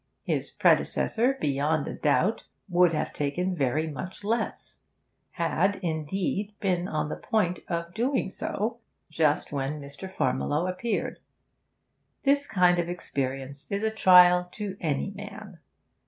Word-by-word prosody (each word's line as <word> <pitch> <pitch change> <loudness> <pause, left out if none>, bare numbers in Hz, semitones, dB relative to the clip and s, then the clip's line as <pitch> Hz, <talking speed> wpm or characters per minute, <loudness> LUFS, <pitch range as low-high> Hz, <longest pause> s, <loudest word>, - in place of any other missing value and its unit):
His - - -1
predecessor, 250 +4 +2
beyond 145 +2 0
a - - -4
doubt, 185 +8 +1 0.2
would 180 -2 +4
have 155 - -2
taken 180 +6 -1
very 145 +1 +1
much 185 +6 -7
less; 225 +3 -2 0.5
had, 170 +4 +1
indeed, 190 +6 -2
been 180 -2 0
on 155 -3 -2
the - - -3
point 180 -6 0
of 170 0 -3
doing 240 -2 0
so 225 +5 -3 0.3
just 155 -2 +1
when 140 +1 -2
Mr. 140 +6 -8
Farmiloe 145 - 0
appeared. 200 +6 -2 1.0
This 285 +1 +3
kind 180 -8 +4
of 170 0 -1
experience 140 -4 -4
is 200 +1 -1
a 220 - +1
trial 180 -4 +6
to 205 -3 -5
any 155 +3 -1
man. 205 -2 -10
180 Hz, 130 wpm, -27 LUFS, 150-200 Hz, 1.0 s, trial